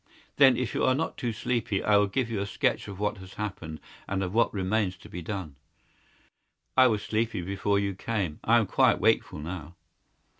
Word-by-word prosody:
"Then, 135 -4 +7
if 125 -2 -2
you - - 0
are 130 - +4
not 160 +4 -2
too 120 - -2
sleepy, 110 -1 -1
I 105 - +4
will 100 0 +4
give 125 +5 -1
you 110 - -1
a 100 - -2
sketch - - 0
of 100 -2 -7
what 105 0 -1
has 95 0 -12
happened, 90 -7 -5 0.3
and 95 -1 -1
of 90 0 -3
what 115 +1 +3
remains 95 -1 0
to - - -14
be 90 - -6
done." 85 -5 -5 1.2
"I 130 0 +7
was 105 -3 0
sleepy 110 -4 -1
before 100 +2 0
you 100 -1 0
came. 95 -5 -3
I 115 +2 +5
am 115 - +3
quite - - +3
wakeful - - +2
now." 80 +1 -7
100 Hz, 200 wpm, -28 LUFS, 95-115 Hz, 1.2 s, Then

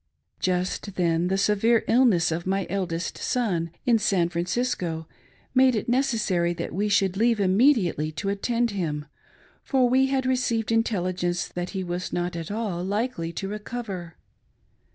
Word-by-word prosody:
Just 185 +2 -1
then, 170 -1 +1
the 190 +1 +1
severe 210 +3 +3
illness 225 -10 +4
of 170 +3 -3
my 195 0 0
eldest 185 -3 -2
son, 185 -10 0 0.2
in 235 -2 +4
San 185 -4 +2
Francisco, 175 -2 -2 0.5
made 260 -1 +5
it 215 - -2
necessar)^ 215 -9 +1
that 170 - -4
we 205 +3 0
should 195 -2 +2
leave 230 0 +3
immediately 190 - +3
to 195 - -3
attend 230 +4 0
him, 155 -7 -3 0.6
for 260 -3 +2
we 260 +2 +3
had 265 -1 0
received 245 -4 0
intelligence 185 -6 0
that 175 0 -4
he 190 - -1
was 180 0 -4
not 175 0 -2
at 165 -1 -5
all 205 -5 -2
likely 200 -3 -2
to 195 - -4
recover. 205 -5 -6
195 Hz, 150 wpm, -25 LUFS, 175-230 Hz, 0.6 s, made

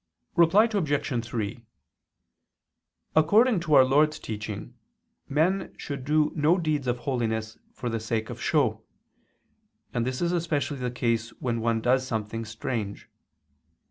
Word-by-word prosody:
Reply 170 +5 +6
Obj. 145 - 0
3: 115 -1 -4 1.5
According 205 +8 +5
to 155 -3 +2
our 130 -1 +8
Lord's 150 +4 +3
teaching 105 -1 -6 0.6
men 165 +7 +1
should 140 -3 -6
do 150 +1 +2
no 155 +3 +3
deeds 155 -6 -1
of 120 0 +1
holiness 110 -3 -2
for 125 - -6
the 115 -1 -1
sake 110 0 -2
of - - -8
show: - - +1 1.1
and 120 - 0
this 125 +1 -2
is 170 0 +1
especially 155 -5 -1
the 125 -1 -1
case 115 -2 -1
when 120 -3 -1
one 115 0 +1
does 130 +2 +3
something 115 -1 -3
strange. 110 -1 -4
130 Hz, 135 wpm, -27 LUFS, 115-155 Hz, 1.5 s, our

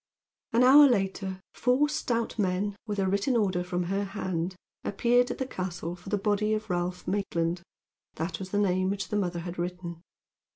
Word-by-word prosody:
An 235 +2 +5
hour 285 +3 +9
later 190 -4 -1
four 255 +5 +3
stout 235 -6 -2
men, 195 +1 0
with 205 -1 -2
a 195 - +1
written 200 +6 +1
order 190 -5 +1
from 180 0 -2
her 195 +3 -1
hand, 185 -3 -3 0.3
appeared 245 +4 +2
at - - -3
the 265 - -2
castle 180 -6 -4
for 180 +2 -11
the 205 - +1
body 210 +1 +1
of 215 -2 -4
Ralph 180 0 -2
Maitland. 175 -3 -1 0.5
That 160 +1 -3
was 190 -1 -6
the 205 - -1
name 185 -2 +2
which 200 0 -3
the - - -2
mother 175 -4 -1
had 175 +1 -6
written. 175 -1 -4
195 Hz, 180 wpm, -28 LUFS, 180-215 Hz, 0.5 s, hour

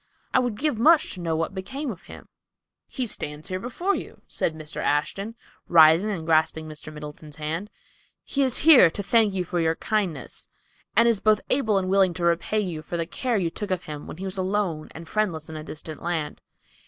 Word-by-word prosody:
I - - +5
would 245 -4 -1
give 290 -4 0
much 310 +5 +5
to 185 - -9
know 165 -2 -1
what 165 +3 -2
became 260 +9 -4
of 185 - -10
him." - - -12 0.6
"He 255 - -3
stands 150 -8 -4
before 245 - -1
you," - - -7
said 160 - -2
Mr. 155 -1 -9
Ashton, 195 +9 -1 0.3
rising 165 +4 +6
and 175 -6 -3
grasping 160 -1 +2
Mr. 155 0 -9
Middleton's 150 0 -9
hand. 160 +7 -4 0.5
"He 280 - -1
is 265 +1 +1
here 280 - +9
to 200 +5 -5
thank 215 -1 +3
you 180 -1 -1
for 175 0 -2
your 165 -1 +2
kindness, 185 - -3 0.5
and 230 +3 +6
is 230 -4 +3
both 215 0 +3
able 220 -7 +3
and 185 -1 0
willing 190 -2 +3
to 175 - -4
repay 170 +5 +1
you 175 -6 -4
for 170 +3 -5
the 165 - -1
care 240 +7 -1
you 170 -4 0
took 210 +3 -5
of 185 -1 -1
him 150 -1 -7
who 185 +5 -7
was 190 0 -3
alone 185 -5 -1
and 165 0 -9
friendless 170 -7 -1
in 160 - -7
a 155 - -6
distant 155 0 -8
land." 165 -4 -3
185 Hz, 205 wpm, -25 LUFS, 160-215 Hz, 0.6 s, here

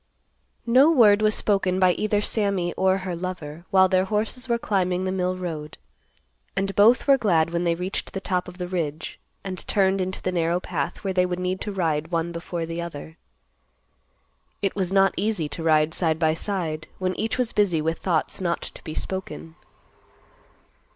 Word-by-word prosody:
No 255 +6 +6
word 215 -8 +6
was 215 0 +3
spoken 195 -3 +1
by 185 -1 +5
either 210 +2 0
Sammy 200 -5 0
or 190 0 +2
her 180 -2 -3
lover, 170 -2 -6
while 190 -1 +5
their 185 0 +2
horses 220 +5 -2
were 235 - +2
climbing 185 -5 0
the 185 - -1
mill 185 -1 -1
road, 160 -4 -6 0.8
and 195 0 -1
both 225 +5 +5
were 275 -1 +5
glad 165 -7 +2
when 170 +1 -1
they 170 -1 +2
reached 180 +3 -4
the 195 - -2
top 180 -2 -2
of 180 0 -10
the 180 -1 -4
ridge, 160 -4 -4 0.2
and 185 -2 -5
turned 195 -1 +2
into 185 0 -3
the 185 - -2
narrow 170 0 +1
path 180 -1 -4
where 195 -1 -1
they 180 0 +2
would 180 0 -3
need 180 +1 -2
to 210 - -3
ride 165 -5 -1
one 170 -1 -1
before 170 0 -4
the 165 +1 -4
other. 160 -1 -8 1.5
It 195 - 0
was 190 -2 -1
not 195 0 +4
easy 205 -6 0
to 165 - -6
ride 155 -1 +3
side 160 -2 +1
by 160 -1 +2
side, 160 -3 -3
when 185 0 -1
each 225 +2 -1
was 250 -2 -1
busy 195 -6 +2
with 160 +2 -1
thoughts 175 0 -1
not 170 -2 -1
to - - -8
be 155 - -6
spoken. 80 - -5
185 Hz, 185 wpm, -24 LUFS, 165-195 Hz, 1.5 s, No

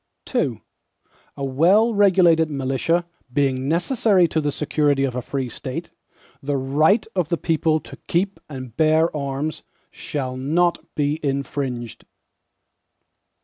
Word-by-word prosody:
II - - 0 0.7
A 140 - -3
well 185 - +4
regulated 180 -6 +4
militia, 140 +5 0 0.3
being 135 -1 0
necessary 185 - +3
to 160 - 0
the 145 -1 0
security 145 -1 +1
of 135 -2 0
a 125 - -2
free 135 +1 -3
State, 135 +7 -6 0.5
the 140 0 -1
right 155 - +2
of 180 -5 0
the 170 - +1
people 160 -1 +1
to - - -11
keep 190 +3 0
and 130 -5 -8
bear 160 +1 +3
arms, 140 +2 -3 0.3
shall 130 -3 -4
not 165 +7 +1 0.2
be 150 +1 0
infringed. 135 -4 -3
150 Hz, 125 wpm, -22 LUFS, 135-170 Hz, 0.7 s, well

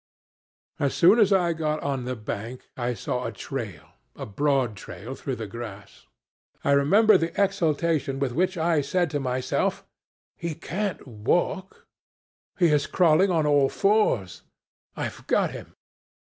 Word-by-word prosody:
"As 140 -2 0
soon 190 +7 +6
as 210 -2 +4
I 180 -3 +3
got 155 -1 -1
on 135 -3 -2
the 130 0 -3
bank 115 +2 -6
I 120 -1 -2
saw 125 +4 -3
a - - -3
trail 110 - -6 0.3
a - - -6
broad 130 +1 0
trail 100 +5 -8
through 135 -1 -4
the 115 - -5
grass. 105 -2 -9 0.6
I - - +2
remember 190 +9 +5
the 165 +3 -3
exultation 160 -6 +1
with 135 -2 -1
which 185 +7 0
I 165 -2 +2
said 175 +3 0
to 145 - -1
myself, 130 -1 -1 0.5
'He 170 -2 -4
can't 195 +5 -4
walk 175 - -1 0.7
he 175 -3 +4
is 150 -2 +2
crawling 180 +2 +4
on 165 -4 +1
all 145 -2 +4
fours 195 - +1 0.6
I've - - -5
got - - +2
him.' - - -10
145 Hz, 145 wpm, -25 LUFS, 125-175 Hz, 0.7 s, soon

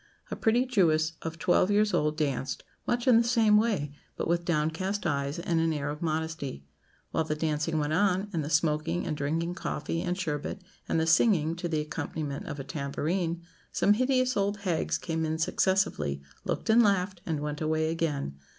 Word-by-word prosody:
A - - -1
pretty 235 +3 +2
Jewess 165 -9 +2
of 165 0 -5
twelve 180 +2 +3
years 210 +1 +3
old 150 0 +1
danced, 140 -3 -2 0.2
much 240 +1 0
in 245 -3 +7
the 230 - +5
same 230 -3 +4
way; 210 -10 +1 0.3
but - - -2
with 170 +1 +1
downcast 170 +5 -1
eyes 140 0 -1
and 170 -1 0
an 165 0 +2
air 145 -2 -2
of 150 - -7
modesty. 160 - -3 0.5
While 160 - 0
the 150 - -1
dancing 155 +1 -1
went 150 0 0
on, 195 +2 +2
and 160 -3 0
the 145 - -4
smoking 160 +1 +1
and 160 -4 -2
drinking 160 +4 -1
coffee 165 -2 -3
and 180 0 -2
sherbet, 160 +2 -3 0.3
and - - +2
the 160 - +2
singing, 165 -2 +3
to 175 0 -3
the 155 -2 0
accompaniment 150 -1 -4
of 145 - -5
a - - -4
tambourine, 165 +4 -2 0.3
some 205 - +4
hideous 255 +2 +2
old 200 0 0
hags 175 -5 0
came 160 -2 -2
in 160 0 -1
successively, 160 - +1 0.2
looked - - 0
and 235 +2 +7
laughed, 195 -4 +1
and 160 -3 -1
went 150 +1 -4
away 155 0 +1
again. 145 - -2
165 Hz, 185 wpm, -28 LUFS, 150-190 Hz, 0.5 s, in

